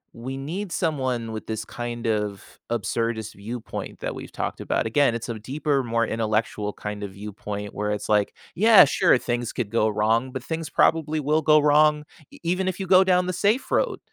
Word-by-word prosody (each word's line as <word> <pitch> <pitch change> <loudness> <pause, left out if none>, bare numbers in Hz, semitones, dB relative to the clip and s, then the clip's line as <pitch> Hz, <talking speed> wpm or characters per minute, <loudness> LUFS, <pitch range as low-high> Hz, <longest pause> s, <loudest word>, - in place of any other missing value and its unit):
we 130 +3 -6
need 170 +7 -5
someone 130 -8 -1
with 110 - -7
this 110 -1 -4
kind 120 -1 -6
of 105 -3 -3
absurdist 115 -1 -2
viewpoint 110 +4 -7
that - - -3
we've - - -9
talked - - -4
about. - - -1
Again, 120 +1 +2
it's 115 - -5
a 115 -2 -5
deeper, 140 +4 -1
more 115 0 0
intellectual 110 -1 -1
kind 105 0 -6
of 100 -2 -6
viewpoint 105 0 -6
where 105 0 -2
it's, 105 -1 -3
like, 105 -1 +2 0.2
yeah, 215 -2 +7
sure, 135 - +3
things 120 -1 -2
could 110 -5 -4
go 110 -1 +2
wrong, 110 +4 +1
but 130 -2 -6
things 160 0 -4
probably 155 0 +2
will 150 +2 +1
go 155 0 +5
wrong 150 0 +4 0.3
e - - -15
even 180 +2 0
if 185 0 -2
you 195 - -2
go 185 +1 +6
down 180 -1 +3
the 185 - -2
safe 210 +8 +1
road. - - +1
120 Hz, 195 wpm, -24 LUFS, 110-155 Hz, 0.3 s, yeah